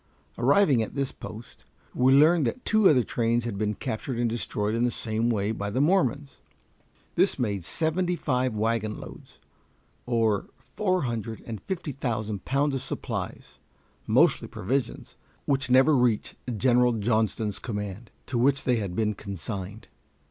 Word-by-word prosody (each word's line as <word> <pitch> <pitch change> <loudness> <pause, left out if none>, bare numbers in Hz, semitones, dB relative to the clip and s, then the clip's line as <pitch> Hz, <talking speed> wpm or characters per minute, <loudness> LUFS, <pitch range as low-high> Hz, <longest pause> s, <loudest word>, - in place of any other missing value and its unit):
Arriving 140 - +4
at 110 - -4
this 140 -1 -1
post, 110 +2 -10 0.3
we 130 +1 +3
learned 150 +1 +5
that 250 - -4
two 215 -3 +5
other 130 -5 +4
trains 115 0 0
had 115 -4 -3
been 105 +1 -1
captured 115 +5 -4
and 120 0 +1
destroyed 110 -2 -2
in 115 +1 +1
the 125 - +3
same 115 0 -2
way 105 -2 0
by 100 -2 -3
the 110 - -1
Mormons. 145 -3 +1 0.7
This - - +2
made 100 -6 -1
seventy 175 - 0
five 130 -6 0
wagonloads, 110 0 -3 0.7
or 115 -4 +1 0.3
four 185 -5 +1
hundred 115 -3 -4
and 110 -4 -6
fifty 180 -5 -4
thousand 110 -6 -3
pounds 140 +2 +1
of 135 - -2
supplies, 135 - -5 0.5
mostly - - +3
provisions, 130 +6 -3 0.3
which 140 -1 0
never 130 +4 +5
reached 120 -4 +1 0.2
General 125 +1 +3
Johnston's 110 -1 0
command, 105 -1 -5 0.2
to 125 -3 -2
which 135 +2 +2
they 125 -2 +2
had 100 -5 -3
been 105 0 +1
consigned. 100 +1 -6
120 Hz, 150 wpm, -26 LUFS, 110-135 Hz, 0.7 s, learned